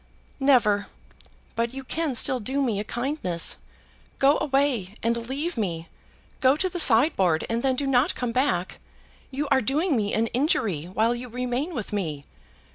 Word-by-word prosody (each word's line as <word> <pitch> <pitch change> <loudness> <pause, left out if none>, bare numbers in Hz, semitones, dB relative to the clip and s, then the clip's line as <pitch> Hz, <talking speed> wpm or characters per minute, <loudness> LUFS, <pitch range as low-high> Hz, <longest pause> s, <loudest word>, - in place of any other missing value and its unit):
"Never. 235 -7 +3 0.7
But 235 +2 -1
you 270 - -6
can 305 0 -2
still 260 +2 +3
do 265 +5 -1
me 225 -6 0
a - - -2
kindness. 240 - -1 0.6
Go 280 +2 +4
away, 270 -9 0
and 235 +1 -1
leave 295 +4 -3
me. 170 -6 -3 0.5
Go 265 +2 +4
to 375 - 0
the 355 0 -3
sideboard, 225 - +4
and 230 +1 0
then 265 0 +1
do 280 - -2
not 265 +1 +2
come 245 -2 -2
back. 230 -8 0 0.5
You 285 +2 -3
are 270 -2 +3
doing 290 - +1
me 210 -3 0
an 225 - +2
injury 230 - 0
while 220 +6 +1
you 245 +1 -6
remain 250 +7 -3
with 215 -3 -5
me." 155 -8 -3
250 Hz, 165 wpm, -25 LUFS, 210-275 Hz, 0.7 s, Go